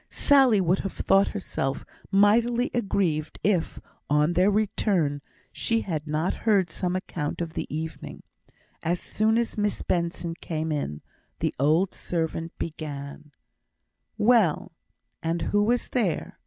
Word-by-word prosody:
Sally 265 -7 +4
would 185 0 +2
have 195 - -4
thought 195 +1 +3
herself 140 -9 -3 0.2
mightily 230 +5 +3
aggrieved 185 -9 0
if, 190 -5 +1 0.3
on 150 +3 +3
their 180 +3 +4
return, 195 -8 +1 0.3
she 230 0 0
had 155 -4 -4
not 155 +4 0
heard 195 -7 +1
some 180 +3 -2
account 165 -5 -3
of 170 -2 -4
the - - -3
evening. 160 +2 -6 0.6
As 175 +2 0
soon 220 +1 +1
as 235 -2 -1
Miss 205 0 -1
Benson 170 -1 -1
came 160 -1 -4
in, 110 - -3 0.3
the - - -1
old 160 +7 +3
servant 165 -1 -3
began: 150 -2 -6 0.9
"Well, 215 -7 +3 0.5
and 165 +1 -1
who 205 - +4
was 235 +3 +1
there? 205 -11 -1
180 Hz, 130 wpm, -26 LUFS, 155-210 Hz, 0.9 s, Sally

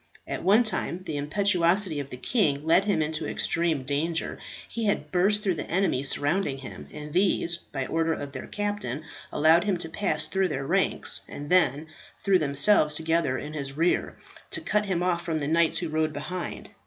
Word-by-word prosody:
At - - -4
one 205 +6 +5
time 185 -5 -2
the 155 - -4
impetuosity 175 +2 +2
of 140 -1 -6
the 125 - -7
king 150 - 0
led 175 +4 +4
him 200 -7 +1
into 155 0 -3
extreme 165 -5 0
danger. 155 +5 -2 0.3
He 230 -1 -4
had 205 - -1
burst 200 +4 +2
through 190 -4 +1
the 165 - -6
enemy 175 -7 +1
surrounding 145 +2 0
him, 130 - -9
and 150 0 -8
these, 180 -2 +2
by 135 -5 -6
order 165 +2 0
of 145 -2 -6
their 130 - -7
captain, 205 - -3 0.3
allowed 160 +3 +4
him 200 -3 +1
to 165 -1 -3
pass 205 +5 0
through 190 0 0
their 135 -4 -4
ranks, - - +1
and 145 +2 -8
then 160 -5 +3 0.3
threw 195 -2 +2
themselves 150 +2 +4
together 160 -4 0
in 145 +4 -7
his 140 -2 -4
rear, 170 +2 +1 0.3
to - - +1
cut 210 0 0
him 175 -2 -1
off 180 -2 0
from 165 -2 -2
the 145 -2 -2
knights 165 +1 +3
who 170 - -2
rode 155 0 0
behind. 155 +5 -6
165 Hz, 190 wpm, -26 LUFS, 145-185 Hz, 0.3 s, one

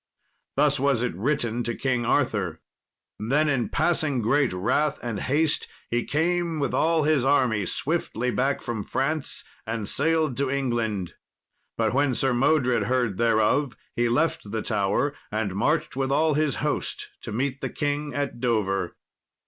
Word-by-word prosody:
Thus 145 0 +3
was 135 -3 +2
it 125 - -1
written 120 - 0
to 120 -1 -2
King 125 -3 0
Arthur. 100 - +1 0.6
Then, 140 +9 +2
in 135 -5 0
passing 155 -6 +1
great 135 +3 +2
wrath 140 +11 +1
and 115 -4 -3
haste, 150 +3 +1 0.2
he 120 0 0
came 170 +1 0
with 140 - -1
all 160 -1 +2
his 150 -3 +3
army 125 -8 +2
swiftly 125 - -1
back 130 +5 0
from 120 -3 -3
France 140 +7 -1 0.2
and 110 -2 -3
sailed 155 +1 +1
to 140 -1 +1
England. 115 -9 -1 0.6
But 110 -1 +1
when 135 -1 +2
Sir 130 +3 +2
Modred 125 0 +2
heard 120 -6 0
thereof, 115 +4 +2 0.2
he 120 -1 +2
left 120 -3 0
the 110 +1 -3
Tower 105 +6 0 0.2
and 105 -3 -1
marched 145 - 0
with 135 0 -1
all 155 +2 +3
his 150 -3 +1
host - - -2
to - - -7
meet 135 +4 -2
the - - -2
king 145 0 -2
at 140 -4 -2
Dover. 100 -7 0
130 Hz, 155 wpm, -25 LUFS, 115-145 Hz, 0.6 s, Thus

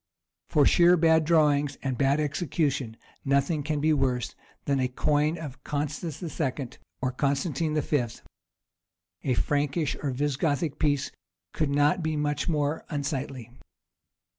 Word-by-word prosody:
For 145 -2 +4
sheer 175 +4 +6
bad 160 -1 +4
drawing 150 -3 +3
and 135 -2 -1
bad 140 +3 +2
execution 145 -5 -1 0.3
nothing 140 +3 +1
can 150 +1 -2
be 155 +2 +3
worse 125 -4 0 0.3
than 140 -1 +1
a 130 - +2
coin 150 +5 +1
of 150 -5 -8
Constans 150 +2 -3
II. 140 -5 -2 0.3
or 130 - +1
Constantine 145 +3 0
V.; 145 -4 +1 1.2
a 130 - +1
Frankish 145 +3 0
or 145 - -1
Visigoth 145 +3 -1
piece 145 -2 +1 0.4
could 155 -3 0
not 145 +4 +3
be 160 -1 -1
much 150 +3 -1
more 150 -1 0
unsightly. 140 -5 -4
145 Hz, 130 wpm, -27 LUFS, 140-155 Hz, 1.2 s, sheer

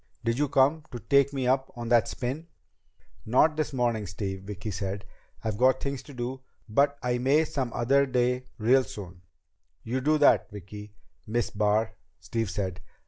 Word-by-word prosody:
"Did 115 +2 0
you 145 -1 +1
come 145 +3 +3
to 125 - -5
take 140 +3 +3
me 135 -2 -2
up 130 +1 +1
on 120 -1 -5
that 120 -2 +4
spin?" 135 +6 -4 0.8
"Not 140 +7 +3
this 155 -1 -1
morning, 120 -5 0
Steve," 95 +1 -5
Vicki 105 +1 -5
said. 100 +1 -4 0.4
"I've 110 -2 -2
got 130 +1 +4
things 140 -2 -3
to 145 - -13
do. 125 +2 -4 0.3
But 140 +6 +2
I 125 0 0
may 140 +5 +3
some 135 -6 -3
other 140 +5 +2
day 125 0 +1
real 125 +4 +4
soon." 90 -7 -9 0.6
"You 130 +3 -2
do 155 +3 +3
that, 145 - +4
Vicki 105 +1 -10 0.3
Miss 115 +1 -1
Barr," 105 +2 +1 0.3
Steve 110 +3 -2
said. 95 -3 -3
120 Hz, 170 wpm, -27 LUFS, 105-135 Hz, 0.8 s, that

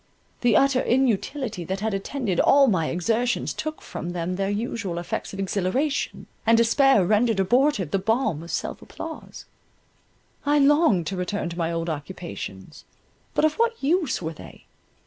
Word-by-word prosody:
The 235 -4 +4
utter 275 -2 +3
inutility 245 -3 0
that 190 +3 -3
had 220 -1 -1
attended 195 -1 -2
all 280 0 +6
my 185 -10 +1
exertions 225 +8 0
took 310 0 -5
from 175 +1 -6
them 175 +1 -2
their 195 +1 -1
usual 205 -4 -3
effects 175 - -4
of 195 - -8
exhilaration, 200 +10 -1 0.2
and 230 0 +4
despair 235 -2 +4
rendered 215 +2 +2
abortive 215 - +2
the 195 - +1
balm 220 - 0
of 170 - -10
self - - -3
applause—I 295 -2 -7
longed 280 - +4
to 195 - -3
return 180 0 -2
to 170 - -8
my 165 0 0
old 165 0 -2
occupations, 155 - -7 0.5
but - - +3
of 310 - +2
what 465 0 +2
use 310 - +1
were 160 +1 -3
they? 85 - -13
210 Hz, 155 wpm, -24 LUFS, 175-270 Hz, 0.5 s, all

